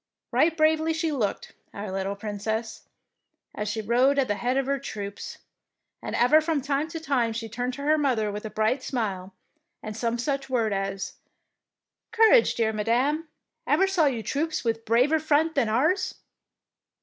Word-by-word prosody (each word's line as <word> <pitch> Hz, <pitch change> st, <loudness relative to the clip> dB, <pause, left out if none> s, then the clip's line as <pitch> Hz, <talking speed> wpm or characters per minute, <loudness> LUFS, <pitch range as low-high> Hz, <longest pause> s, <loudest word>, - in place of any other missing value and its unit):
Right 325 Hz, +1 st, +2 dB
bravely 315 Hz, +1 st, +3 dB
she 320 Hz, 0 st, -1 dB
looked, 230 Hz, -9 st, -2 dB, 0.2 s
our 200 Hz, -1 st, -5 dB
little 195 Hz, +1 st, -2 dB
Princess, 220 Hz, +2 st, -4 dB, 0.7 s
as 210 Hz, -1 st, -3 dB
she 220 Hz, +1 st, -2 dB
rode 250 Hz, +6 st, +3 dB
at 275 Hz, -, +2 dB
the 205 Hz, -, +1 dB
head 245 Hz, +5 st, -1 dB
of 270 Hz, -, +1 dB
her 275 Hz, +1 st, -1 dB
troops, 205 Hz, -6 st, -7 dB, 0.6 s
and -, -, -4 dB
ever 300 Hz, +6 st, +5 dB
from 310 Hz, -1 st, 0 dB
time 280 Hz, +2 st, -1 dB
to 325 Hz, 0 st, -6 dB
time 260 Hz, -7 st, 0 dB
she 225 Hz, 0 st, -4 dB
turned 245 Hz, +3 st, -3 dB
to 280 Hz, -, -7 dB
her 305 Hz, +1 st, +3 dB
mother 235 Hz, -7 st, +1 dB
with 210 Hz, +1 st, -6 dB
a 220 Hz, -, -5 dB
bright 220 Hz, +5 st, 0 dB
smile, 200 Hz, -8 st, -3 dB, 0.5 s
and 215 Hz, -1 st, -6 dB
some 230 Hz, +1 st, -1 dB
such 270 Hz, +2 st, -2 dB
word 230 Hz, -5 st, +1 dB
as 195 Hz, 0 st, -3 dB, 0.3 s
— -, -, -58 dB
'' -, -, -63 dB
Courage, 455 Hz, +1 st, +5 dB
dear 220 Hz, -1 st, +1 dB
Madame, 255 Hz, +9 st, 0 dB, 0.4 s
ever 385 Hz, -, +4 dB
saw 370 Hz, -6 st, +2 dB
you 240 Hz, -5 st, -1 dB
troops 310 Hz, +9 st, -2 dB
with 225 Hz, -1 st, -2 dB
braver 250 Hz, +8 st, +3 dB
front 315 Hz, +1 st, +2 dB
than 270 Hz, -7 st, +1 dB
ours 315 Hz, -, +1 dB
250 Hz, 175 wpm, -26 LUFS, 220-305 Hz, 0.7 s, ever